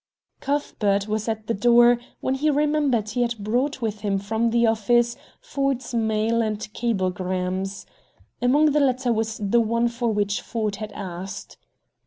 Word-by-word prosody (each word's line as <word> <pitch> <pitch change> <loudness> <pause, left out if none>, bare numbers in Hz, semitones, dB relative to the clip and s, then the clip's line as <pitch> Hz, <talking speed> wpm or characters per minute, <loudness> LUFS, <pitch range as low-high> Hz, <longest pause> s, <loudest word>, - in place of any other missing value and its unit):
Cuthbert 210 -8 0
was 215 +1 -2
at 220 -1 -3
the 230 - -1
door 240 +3 +5 0.2
when 260 - 0
he 290 +3 +1
remembered 290 -7 +1
he 245 - -1
had 235 -1 0
brought 245 +6 -1
with 215 -2 -2
him 205 -2 0
from 220 +4 0
the 235 +1 +3
office 235 +2 +2 0.3
Ford's 275 - -2
mail 225 0 +1
and 215 -2 -1 0.2
cablegrams. 185 -3 -2 0.6
Among 290 +5 +4
the 300 - +2
latter 255 -3 +2
was 220 0 -2
the 215 +3 +2
one 230 +1 +1
for 235 0 -1
which 205 -1 0
Ford 215 -4 -3
had 215 -1 -6
asked. 190 0 -7
225 Hz, 155 wpm, -24 LUFS, 205-245 Hz, 0.6 s, door